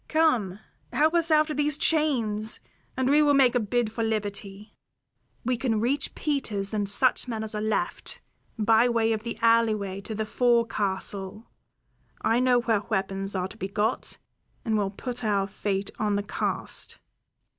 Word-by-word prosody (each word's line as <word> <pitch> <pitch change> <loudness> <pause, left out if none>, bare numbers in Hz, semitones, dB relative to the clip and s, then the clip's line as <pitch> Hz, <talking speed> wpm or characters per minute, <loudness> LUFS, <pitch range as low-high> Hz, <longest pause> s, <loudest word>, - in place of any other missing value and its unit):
Come, 250 - +2 0.3
help 310 +2 +2
us 335 -1 +3
out 310 0 +3
of 300 - -4
these 295 -1 +2
chains, 235 -10 +1 0.4
and 260 -1 +1
we 290 +3 +5
will 290 -1 +4
make 260 -3 +5
a 245 - +2
bid 230 +1 0
for 230 +1 -2
liberty. 205 -1 -4 0.7
We 250 0 +1
can 230 -3 0
reach 270 +5 -1
Peters 220 -9 -1
and 205 -2 -1
such 255 +5 +3
men 225 -3 -3
as 220 - -5
are 210 - -3
left, 215 0 -2 0.4
by 225 +2 +4
way 225 -1 +2
of 215 - -3
the 235 +1 -5
alleyway 215 -4 +2
to 215 +2 -6
the 220 +1 -2
forecastle; 210 -3 -1 0.7
I 230 +2 +2
know 250 -1 +3
where 225 -3 +1
weapons 195 -1 -2
are 185 -1 -1
to 220 - -13
be 190 - -3
got, 210 +4 -1 0.5
and 220 -2 +1
we'll 205 -2 +1
put 245 +5 -6
our 200 -2 +1
fate 195 0 -3
on 210 -1 +1
the 200 - -1
cast. 205 - -1
220 Hz, 165 wpm, -26 LUFS, 205-250 Hz, 0.7 s, we